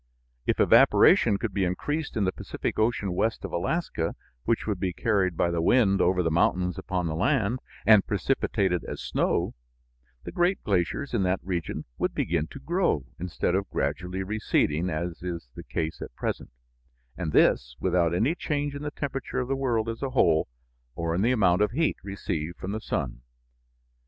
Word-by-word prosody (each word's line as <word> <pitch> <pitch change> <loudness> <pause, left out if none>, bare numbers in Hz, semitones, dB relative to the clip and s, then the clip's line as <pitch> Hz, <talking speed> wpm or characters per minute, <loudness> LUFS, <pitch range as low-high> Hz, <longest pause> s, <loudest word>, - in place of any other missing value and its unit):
If - - +1
evaporation 100 - +6
could 110 -1 -3
be 100 - +1
increased 145 - -2
in 105 - +2
the 95 - +1
Pacific - - -4
Ocean 110 -4 +1
west 110 +5 0
of - - -6
Alaska, 85 - -1 0.3
which 115 - +1
would 105 -4 -2
be 90 -1 -1
carried 95 -4 +1
by 85 - +2
the 85 -1 0
wind 100 -1 +4
over 90 0 +3
the 80 - 0
mountains 90 +2 +1
upon 90 -2 -2
the 80 - -1
land, 115 - +1 0.3
and 110 -2 +6
precipitated 100 -4 0
as - - -6
snow, - - 0 0.7
the - - -6
great 175 +2 +2
glaciers 100 +8 -1
in - - +2
that 90 0 +1
region 85 -4 -3
would - - -1
begin 80 -2 0
to 140 - -10
grow 170 - 0
instead 90 0 -1
of 100 +1 0
gradually 90 +7 -2
receding, 95 -5 0
as 85 0 -3
is 85 -8 -5
the - - -9
case 80 -1 -3
at - - -8
present, - - -3 0.7
and 85 -4 -3
this - - +3
without 90 -3 +2
any 110 - +2
change 145 -4 -2
in 140 - -6
the 150 - -3
temperature 135 -3 -4
of 125 - 0
the 135 - +1
world 120 -5 0
as 115 0 -4
a 135 - -1
whole 85 -11 +3 0.5
or 85 0 -1
in 90 - 0
the 115 +4 +3
amount 100 -6 +3
of 105 - +3
heat 160 +7 0
received 85 -4 -4
from 95 - -5
the 110 +1 -3
sun. - - -3
95 Hz, 180 wpm, -27 LUFS, 85-115 Hz, 0.7 s, evaporation